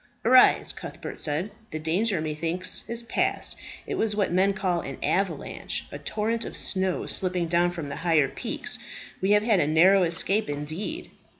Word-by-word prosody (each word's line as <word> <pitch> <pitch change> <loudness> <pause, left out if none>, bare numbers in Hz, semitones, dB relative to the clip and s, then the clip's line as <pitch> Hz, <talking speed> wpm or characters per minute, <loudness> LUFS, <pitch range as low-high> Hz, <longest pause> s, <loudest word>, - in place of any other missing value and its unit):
"Arise," 255 +2 +6
Cuthbert - - -8
said; 160 +7 0 0.2
"the 155 - -4
danger, 175 +5 0
methinks, 165 +4 -2
is 235 0 -1
past. 230 - -1 0.3
It - - -3
was 215 -2 +1
what 200 -4 0
men 190 +3 +3
call 185 -3 -1
an 135 - -7
avalanche 195 +1 -2
a - - -7
torrent 225 +2 -2
of - - -3
snow 190 -2 -1
slipping 180 -2 0
down 175 +1 +2
from 170 -4 -6
the - - -5
higher 165 -5 +3
peaks. - - -3 0.4
We 190 - +1
have 210 0 +4
had 215 -4 +3
a 145 - +2
narrow 180 +5 +5
escape 180 +3 +2
indeed." 155 - -4
185 Hz, 170 wpm, -26 LUFS, 165-210 Hz, 0.4 s, Arise